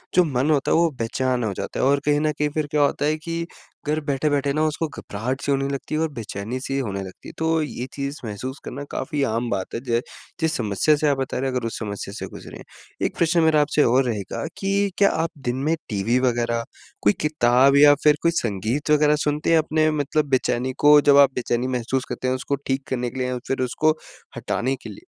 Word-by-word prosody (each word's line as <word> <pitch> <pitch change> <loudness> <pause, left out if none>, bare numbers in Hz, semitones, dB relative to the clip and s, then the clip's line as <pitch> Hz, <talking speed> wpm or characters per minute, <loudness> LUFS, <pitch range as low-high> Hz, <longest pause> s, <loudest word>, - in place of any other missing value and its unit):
जो 180 - +6
मन 140 -1 0
होता 140 -3 +1
है, - - +4
वो 170 0 +4
बेचैन 125 +2 -1
हो 105 - -1
जाता - - -5
है। - - +2
और 140 +1 +3
कहीं 145 0 +3
न 155 0 +1
कहीं 150 0 -1
फिर 155 -1 -1
क्या 150 -1 +2
होता 145 0 +1
है 155 +1 +1
कि 165 +2 -4 0.4
घर 155 +1 +1
बैठे-बैठे 145 0 0
ना 155 +2 +1
उसको 155 +1 -2
घबराहट 130 0 -5
सी 145 - -1
होने 135 0 +1
लगती 140 +2 -4
है 155 - 0
और 160 - 0
बेचैनी-सी 120 +4 -4
होने 100 -7 -3
लगती 95 -1 -11
है, - - -11
तो 160 0 +1
ये 140 -4 -4
चीज़ 140 +1 -4
महसूस 125 +6 -5
करना 140 +3 -6
काफ़ी 150 - -3
आम 115 -1 -1
बात 95 - -3
है। - - -2
जो 120 -3 0 0.4
जिस 160 -1 +1
समस्या 110 +7 +2
से 150 +1 0
आप 140 -2 +2
बता 135 -1 -3
रहे 135 +1 -1
हो, - - -5
अगर 120 -2 -2
उस 115 - -5
समस्या 100 -2 -5
से - - -5
गुजरें, - - -10 0.4
एक - - -2
प्रश्न 170 0 +3
मेरा 155 -2 +4
आपसे 150 0 +2
और 130 +3 +4
रहेगा 110 -1 -3
कि 200 0 0
क्या 200 - +5
आप 165 +1 -1 0.2
दिन 120 - +1
में 165 - +3
टीवी 110 +4 +1
वग़ैरह, 120 -1 0 0.4
कोई 105 - +4
किताब 135 -2 +4
या 145 0 +8
फिर 150 -1 +5
कोई 170 - +3
संगीत 115 - -1
वग़ैरह 150 0 +4
सुनते 150 +2 0
हैं 165 - +6
अपने 155 0 +2
मतलब 150 0 0
बेचैनी 130 -1 0
को 150 0 +7
जब 145 -1 +5
आप 140 -1 +7
बेचैनी 120 0 -1
महसूस 130 +1 -1
करते 130 - -3
हैं, 130 - +1
उसको 135 +2 -2
ठीक 135 +1 0
करने 125 -1 -1
के 130 - -7
लिए 125 - 0
या 125 0 -2
फिर 135 - -1
उसको 155 +5 +1 0.4
हटाने 130 +3 -1
के - - -7
लिए? 325 - -12
135 Hz, 230 wpm, -23 LUFS, 120-150 Hz, 0.4 s, या